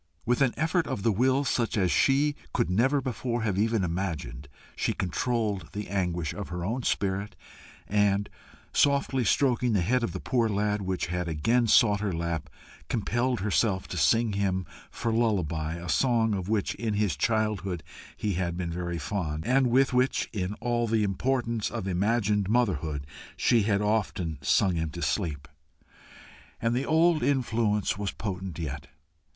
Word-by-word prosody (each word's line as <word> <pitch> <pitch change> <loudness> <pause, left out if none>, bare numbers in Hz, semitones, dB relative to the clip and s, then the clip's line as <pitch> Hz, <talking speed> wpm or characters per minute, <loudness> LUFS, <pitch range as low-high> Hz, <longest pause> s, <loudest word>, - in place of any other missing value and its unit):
With 125 +3 +1
an 135 -3 +3
effort 165 +3 +1
of 120 -8 -3
the 115 - +3
will 130 +6 +2
such 120 -4 0
as 95 -4 +2
she 145 +2 +3 0.2
could 90 - +1
never 130 +9 +2
before 120 -2 -2
have 100 -4 0
even 110 -1 +2
imagined, 80 -7 -3 0.3
she - - 0
controlled 105 +1 -1
the 105 0 -5
anguish 90 -5 -1
of 100 - -6
her 90 -1 -4
own 115 +6 -1
spirit, 100 -2 -1 0.5
and, 100 -1 +2 0.5
softly 140 -2 +2
stroking 125 0 +2
the 100 - +2
head 125 +7 +2
of 115 - -1
the - - -5
poor 120 -3 +1
lad, 105 0 0
which 95 -2 -2
had 90 0 -3
again 115 +10 +1
sought 105 -2 +5
her 105 -1 -1
lap, 85 -2 -3 0.4
compelled 120 +1 0
herself 100 -1 +1
to - - -5
sing 105 - +3
him 95 -2 0 0.2
for 115 -1 -2
lullaby 85 -9 0
a 85 0 -7
song 115 - +2
of 95 -1 -3
which 110 -2 0
in 110 -3 -2
his 105 -7 +1
childhood 100 -2 -1 0.3
he 105 -2 -1
had 85 -1 -2
been 90 -2 -3
very 85 0 -3
fond, 80 -1 -3
and 130 +2 +3
with 130 +2 +3
which, 125 +1 +2
in 100 -1 -2
all 120 +1 -1
the 110 -1 +2
importance 115 +2 0
of 115 -5 -4
imagined 105 +1 +1
motherhood, 85 - 0 0.3
she 115 - +3
had 100 0 +1
often 95 -7 -1
sung 80 +7 +3
him 80 -1 -1
to 85 +3 -6
sleep. 75 -4 -2 1.1
And 115 +1 0
the 125 +3 -1
old 160 0 +4
influence 115 -7 +1
was 100 -1 -1
potent 95 -5 -5
yet. 70 -4 -5
105 Hz, 165 wpm, -28 LUFS, 90-120 Hz, 1.1 s, sought